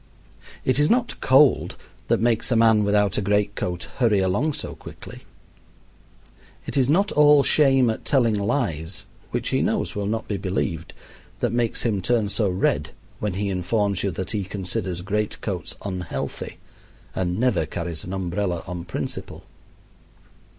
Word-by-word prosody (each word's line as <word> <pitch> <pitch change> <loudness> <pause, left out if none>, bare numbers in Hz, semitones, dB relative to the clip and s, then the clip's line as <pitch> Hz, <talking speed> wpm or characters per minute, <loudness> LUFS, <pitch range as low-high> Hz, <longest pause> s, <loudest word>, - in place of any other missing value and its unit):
It 130 +2 +3
is 150 - +4
not 245 0 +1
cold 135 +1 +4 0.3
that - - +2
makes 115 0 +1
a - - +3
man 110 -2 +5
without 100 -1 +2
a - - -1
great 105 +1 +1
coat 90 -3 -3
hurry 115 -5 +3
along 100 +11 +1
so - - -5
quickly. - - -11 1.4
It - - -5
is 135 -2 +3
not 195 +7 +3
all 150 -1 +6
shame 135 -4 +4
at 110 - -2
telling 120 -5 +3
lies 100 - -1 0.2
which - - -2
he - - +1
knows - - 0
will 100 -1 -2
not 110 +1 -2
be 105 - -2
believed 90 -4 -2 0.5
that - - 0
makes 120 -1 0
him 105 -5 0
turn 110 +1 +1
so 105 -1 +1
red 90 +1 0 0.3
when 105 -3 -1
he 100 +1 -1
informs 100 +1 0
you 100 - 0
that 95 0 -4
he 105 -3 -1
considers 95 -1 -4
great 105 +2 -2
coats 90 -6 -4
unhealthy 90 -3 -4 0.6
and 90 -1 -1
never 125 - +2
carries 85 0 -5
an 90 - -7
umbrella 90 -1 -2
on 90 -2 -6
principle. 90 - -5
105 Hz, 155 wpm, -24 LUFS, 95-120 Hz, 1.4 s, all